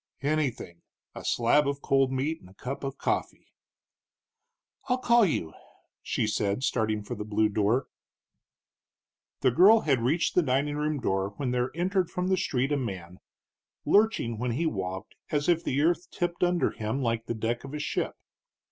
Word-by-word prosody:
"Anything 140 - -2 0.3
a - - -9
slab 140 +5 +3
of 140 0 -3
cold 135 -1 +2
meat 145 +5 -1
and 90 - -15
a 95 - -19
cup 135 +7 -6
of 135 -1 -4
coffee." - - -3 1.4
"I'll 250 - +3
call 235 -3 +4
you," 80 - -2 0.5
she - - -1
said, 105 +2 -1
starting 110 -6 0
for 110 - -6
the 105 -3 -5
blue 110 0 +1
door. 110 +5 +1 1.6
The 130 - +4
girl 205 - +7
had 135 - +1
reached 150 +9 +1
the 180 - +4
dining 145 0 0
room 150 0 -1
door 95 -3 -1
when 130 -3 -2
there 125 0 0
entered 180 +1 0
from 180 +1 -2
the 190 - +4
street 135 -6 0
a 145 - +2
man, 95 -8 -5 0.7
lurching 200 - +2
when 125 0 -1
he 160 +8 -1
walked 95 - -3 0.2
as 145 -1 0
if 170 -1 +3
the 135 - -1
earth 175 +2 +1
tipped 175 0 -2
under 175 -1 +2
him 110 +5 -3
like 115 -1 -1
the 115 - -2
deck 115 +2 -2
of 135 +2 -7
a - - -4
ship. 145 - -2
135 Hz, 175 wpm, -28 LUFS, 110-160 Hz, 1.6 s, girl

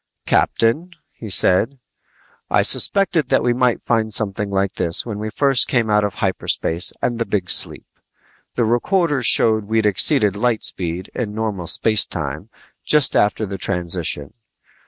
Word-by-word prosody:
"Captain," 135 +11 0 0.2
he 110 - -10
said, 100 +8 +2 0.7
"I - - +2
suspected 185 -8 +1
that - - +1
we 120 - +1
might 125 -1 0
find 110 -2 -1
something 105 -1 +2
like 100 0 -2
this 85 -1 -2
when 105 -3 -6
we 110 +1 -5
first 135 +2 +1
came 115 -4 -1
out 105 0 +2
of 100 -2 -3
hyperspace 90 -3 0
and 120 -1 -2
the 115 - -1
big 100 -3 -2
sleep. - - +2 0.7
The 120 - 0
recorders 135 - 0
showed 110 -2 +3
we'd 110 +1 -1
exceeded 105 - +3
light 115 +1 -1
speed 90 +1 -2
in 105 -4 -5
normal 105 -6 -4
space 110 +4 +2
time - - -6 0.3
just 150 -3 +4
after 105 +1 +1
the 100 -1 -7
transition. 85 -6 -2
110 Hz, 155 wpm, -18 LUFS, 100-120 Hz, 0.7 s, just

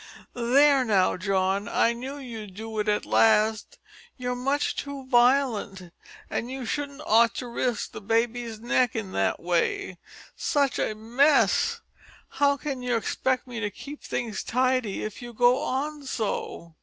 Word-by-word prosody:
"There 270 +3 +4
now, 200 -6 +2
John, 195 +1 0
I 230 - +2
knew 260 +4 -6
you'd 225 -8 -8
do 220 +1 -5
it 210 - -1
at 210 - 0
last. 220 -1 +2 0.4
You're 250 -1 -2
much 275 +4 0
too 280 -2 -6
violent, 240 -8 +2 0.3
and 235 - -3
you 260 -1 -5
shouldn't 285 +3 -4
ought 230 +1 +4
to 250 - -4
risk 240 -1 -2
the - - -8
baby's 230 +1 -1
neck 240 +1 +1
in 205 -4 -4
that 95 - 0
way. 180 - -1 0.4
Such 280 -4 0
a 215 - -1
mess! 280 - +2 0.5
How 280 -1 +2
can 275 -3 -4
you 245 -1 0
expect 255 +3 -1
me 245 -2 -6
to 205 -2 -1
keep 285 +8 -10
things 230 -4 -3
tidy 255 -4 0
if 215 +2 -6
you 240 -1 -8
go 245 +2 +4
on 290 +3 -3
so?" 200 -7 -4
240 Hz, 155 wpm, -26 LUFS, 215-265 Hz, 0.5 s, There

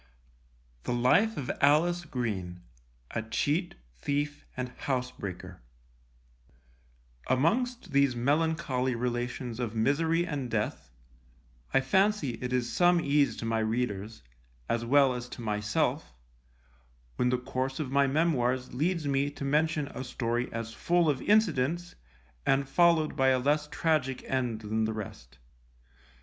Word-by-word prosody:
The 120 - -2
Life 180 - +3
of 135 -4 -2
ALICE 170 +5 +3
GREEN, 95 -10 -4 0.5
a 115 - -2
Cheat, 150 - -1 0.2
Thief 145 - -2
and 125 0 -3
Housebreaker 125 - -5 1.7
Amongst 205 - +1
these 140 -2 +3
melancholy 140 -1 0
relations 120 0 -3
of 115 -2 -3
misery 160 +9 +2
and 145 -7 -3
death, 105 - -2 0.8
I - - +4
fancy 190 +1 +2
it 125 0 -3
is 125 -1 -1
some 175 0 +4
ease 140 -6 +2
to - - -5
my 115 0 0
readers, 110 - -2 0.4
as 115 0 0
well 135 +2 +4
as 125 0 -6
to - - -8
myself, 105 - -1 1.0
when 125 - +2
the 125 - +2
course 130 +2 -3
of 140 -4 -3
my 140 0 +4
memoirs 130 -4 +1
leads 160 +3 0
me 140 0 +1
to 145 -1 -7
mention 150 +1 +1
a - - -6
story 120 -1 -2
as 115 0 -5
full 175 -2 +2
of 135 - -4
incidents, 175 -5 +2 0.5
and 135 - +2
followed 165 +1 +3
by 135 - +2
a 130 -1 +4
less 145 +3 +1
tragic 150 -5 0
end 125 -4 -1
than 110 +1 -1
the 110 - -2
rest. 100 - -8
130 Hz, 135 wpm, -29 LUFS, 120-155 Hz, 1.7 s, I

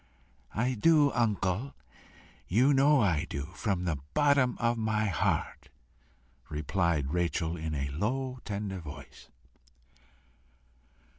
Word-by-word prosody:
"I 125 +4 +1
do, 145 +4 +4
uncle; 110 +1 -1 0.7
you 125 +9 +4
know 140 +1 +5
I 85 -6 +1
do 70 +3 -5
from 95 -4 -2
the 80 -5 -1 0.2
bottom 140 -4 +3
of 120 0 +1
my 110 -1 0
heart," 100 -5 -1 0.8
replied 75 -2 -1
Rachel 85 -1 0
in 80 -2 -4
a 70 -1 -2
low 125 - -2
tender 100 -2 -4
voice. 70 -4 -11
100 Hz, 105 wpm, -30 LUFS, 80-125 Hz, 0.8 s, know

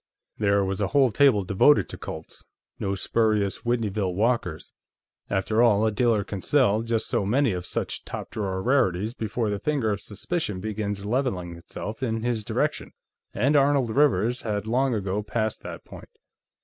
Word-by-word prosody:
There 100 -2 +2
was 95 +1 -2
a 100 - +2
whole 135 -1 +3
table 115 -3 +4
devoted 100 +10 +4
to - - -7
Colts. - - -8 0.4
No 100 0 -1
spurious 105 0 +1
Whitneyville 105 -6 -1
Walkers; 115 +4 -1 0.6
after 105 +3 +1
all, 110 -3 +4
a 110 - +2
dealer 110 -1 +2
can 100 -1 -6
sell 115 -6 +3
just 115 -1 -1
so - - 0
many 125 +5 +2
of 90 -1 -4
such - - -3
top - - -7
drawer 95 -3 -3
rarities 110 -5 +1
before 110 -1 -2
the 100 - -2
finger 140 -5 0
of 100 -1 -3
suspicion 105 - -3
begins 105 0 -3
leveling 105 -8 -1
itself 105 +7 -7
in 115 -3 -1
his 120 -3 -1
direction, - - -2 0.4
and 135 +9 +2
Arnold 140 -4 +3
Rivers 125 -3 +2
had 105 -2 -2
long 125 +2 +1
ago 100 0 -1
passed 110 +1 -2
that - - -8
point. - - -12
110 Hz, 165 wpm, -25 LUFS, 100-120 Hz, 0.6 s, table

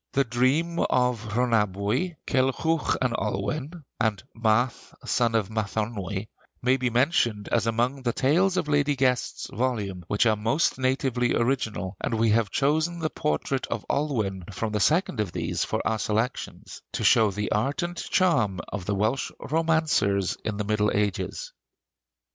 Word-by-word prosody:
'The 140 0 +3
Dream 135 +8 +1
of 125 -3 +2
Rhonabwy,' 115 - +1
'Kilhwch 135 +5 +1
and 125 -2 +1
Olwen,' 140 - -3 0.2
and 110 -5 0
'Math, 115 +2 0
Son 115 -2 +1
of 105 -3 +1
Mathonwy,' 105 -2 -3 0.3
may 125 +1 +3
be 125 -1 0
mentioned 120 -4 +1
as 115 -1 +2
among 120 +4 0
the 120 -2 0
tales 175 +10 +2
in - - +1
Lady 145 -1 +2
Guest's 125 -3 0
volume 105 -7 -2
which 105 +5 +2
are 110 -2 +4
most 115 +7 +1
natively 130 -2 +1
original; 110 -6 -1
and 115 - -1
we 110 0 +2
have 110 -1 +2
chosen 155 - +1
the 155 -2 -2
portrait 125 - -1
of 110 - -4
Olwen 110 -11 -1
from 110 +3 -3
the 105 - 0
second 155 - +2
of 100 -5 -1
these - - -1
for - - -2
our 110 - 0
selections, 110 +5 -3
to - - -2
show 110 -2 +5
the 105 +2 -3
art 135 - 0
and 175 0 -3
charm 140 - +1
of 100 -3 -5
the 105 - 0
Welsh 110 +7 0
romancers 155 - +1
in 110 -2 -3
the 105 - -1
Middle 105 0 +1
Ages. 105 - -2
120 Hz, 155 wpm, -26 LUFS, 105-140 Hz, 0.3 s, show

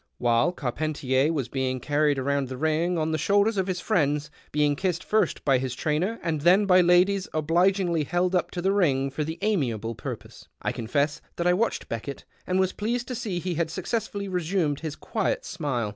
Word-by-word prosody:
While 120 +7 +2
Carpcnticr 140 -1 0
was 140 -7 -2
being 130 0 -2
carried 145 +2 +1
round 140 0 0
the 130 0 -6
ring 160 +4 +1
on 160 0 0
the 155 - -1
shoulders 205 +6 +3
of 190 -1 0
his 185 -2 -2
friends, 150 -7 0 0.2
being 150 -1 +2
kissed 180 +2 -1
first 215 0 0
by 135 -3 +4
his 130 -1 -3
trainer 165 - -1
and 160 -4 -1
then 185 +6 +5
by 185 -1 +6
ladies 180 +2 +3
obligingly 170 +1 +2
held 175 +4 0
up 180 - +1
to 175 - -5
the 190 - +3
ring 140 -9 +2
for 150 +3 -2
the 160 +2 -5
amiable 120 - 0
purpose, - - -8
I - - -1
confess 140 +6 -1
that 170 - -2
I 180 - +5
watched 225 +6 -1
Beckett, 115 +5 -6 0.2
and 185 +1 +1
was 190 0 +1
pleased 235 +3 -2
to - - -2
see 225 -7 -3
he 180 +1 -2
had 165 0 -1
successfully 200 +3 -3
resumed 175 -5 -1
h'S 155 -2 -4
quiet - - -2
smile. 130 - -2
160 Hz, 195 wpm, -26 LUFS, 140-185 Hz, 0.2 s, by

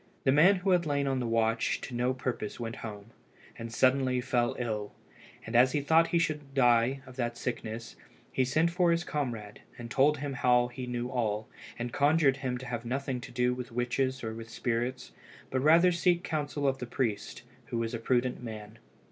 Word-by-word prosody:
The 135 - +4
man 170 +8 +6
who 190 +1 0
had 175 -3 +3
lain 140 -1 +1
on 135 -1 0
the 120 - -2
watch 115 0 +1
to 130 - -7
no 125 +1 +1
purpose 125 -4 -4
went 115 -1 -5
home, 105 0 -8 0.4
and 115 0 -7
suddenly 130 +1 +2
fell 125 0 0
ill; 105 -4 -3 0.5
and 115 - -5
as 125 +2 +5
he 145 - +1
thought 160 +3 +4
he 170 - +1
should 150 -4 -2
die 125 +1 +3
of 130 0 -13
that 120 -2 -2
sickness, 115 -2 -5 0.4
he 130 - +1
sent 155 +6 +2
for 175 0 +2
his 170 0 +2
comrade, 120 -10 -4 0.2
and 120 -1 -8
told 145 +2 +4
him 140 0 -4
how 125 -1 +3
he 125 +1 -7
knew 125 0 -3
all, 110 -3 -1 0.3
and 120 0 -4
conjured 145 -1 +3
him 130 -3 -2
not 125 - -4
to - - -8
have 120 -1 -4
anything 130 +1 -3
to - - -9
do 125 0 +1
with 125 -1 -6
witches 125 +2 -1
or 110 -1 -3
with 115 0 -8
spirits, 120 +2 -2 0.4
but 130 - 0
rather 165 +5 +6
to 170 - -2
seek 175 0 +3
counsel 145 -2 -2
of 135 0 0
the 125 - -5
priest, 115 -4 -3 0.2
who 120 - -3
was 115 0 -2
a 115 - -2
prudent 125 +2 0
man. 110 -2 -8
125 Hz, 205 wpm, -30 LUFS, 120-140 Hz, 0.5 s, man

